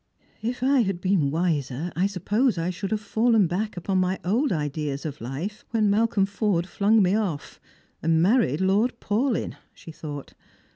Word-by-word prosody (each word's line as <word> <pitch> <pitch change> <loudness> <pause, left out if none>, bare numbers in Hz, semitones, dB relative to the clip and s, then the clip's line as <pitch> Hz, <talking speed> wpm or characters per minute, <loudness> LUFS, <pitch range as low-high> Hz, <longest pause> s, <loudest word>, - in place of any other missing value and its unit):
" - - -35
If 250 0 -7
I 270 +1 +4
had 195 -6 0
been 185 -6 +2
wiser, 155 -1 -1
I 185 +4 +2
suppose 205 +5 0
I 165 +2 -1
should 185 +2 -5
have 215 - 0
fallen 220 0 +3
back 190 +5 -2
upon 190 +2 0
my 185 +1 +1
old 245 +10 +1
ideas 150 -2 -2
of 150 -2 -5
life 145 - -5
when 215 -3 +2
JMalcolm 205 -2 +2
Forde 200 -4 0
flung 205 +3 +3
me 185 +1 +2
off, 195 -9 -2 0.4
and 160 0 +2
married 190 - +3
Lord 210 +6 +2
Paulyn," 230 +4 -1 0.2
she 165 - -11
thought. 145 -3 -8
190 Hz, 175 wpm, -25 LUFS, 165-215 Hz, 0.4 s, I